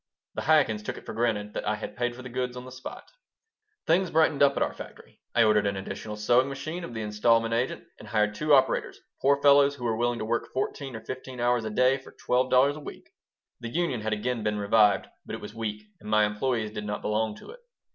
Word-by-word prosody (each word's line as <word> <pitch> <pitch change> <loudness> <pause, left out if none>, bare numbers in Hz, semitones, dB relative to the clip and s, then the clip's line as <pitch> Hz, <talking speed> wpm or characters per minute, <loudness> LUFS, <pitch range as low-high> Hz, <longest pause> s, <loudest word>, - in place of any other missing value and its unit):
The - - -4
Chaikins 145 -9 +3
took - - -5
it - - -12
for - - -6
granted 110 -2 -1
that - - -4
I 105 - +1
had 105 0 -7
paid 120 +1 -1
for 125 - -10
the 125 - -7
goods 125 0 -3
on 125 - -7
the 130 - -10
spot 130 +1 -9 0.7
Things 180 +2 +2
brightened 160 -3 +2
up 140 -1 +5
at - - +3
our - - -2
"factory." - - -12
I 120 - +6
ordered 105 -2 +3
an 100 -1 -1
additional 100 +2 -6
sewing 120 +5 +3
machine 155 +6 -5
of 120 - -7
the 110 - -3
instalment 115 +2 +2
agent 120 +3 -1 0.2
and 110 - -11
hired 105 -1 +1
two 150 +8 -2
operators 135 -2 +3 0.2
poor 140 +1 +4
fellows 140 0 +6
who 125 - -10
were 115 -2 0
willing 120 +1 0
to 110 - -4
work 120 +2 -1
fourteen 135 0 -3
or 110 - -7
fifteen 130 0 -7
hours 120 -1 +1
a - - -2
day 125 +5 +3
for 130 - -15
twelve 130 +1 0
dollars 140 +3 +4
a - - -7
week. 150 - -10 0.5
(The 120 -1 -6
union 145 -5 -1
had 110 +1 -2
again 115 +3 -1
been 105 0 -1
revived, 105 0 +3 0.2
but - - -6
it - - -9
was - - -8
weak, 105 -2 -4 0.2
and 105 - -10
my 105 0 +4
employees 110 +1 -1
did 105 -1 -6
not 105 0 -4
belong 105 0 0
to - - -12
it.) - - -13
120 Hz, 240 wpm, -27 LUFS, 105-130 Hz, 0.7 s, I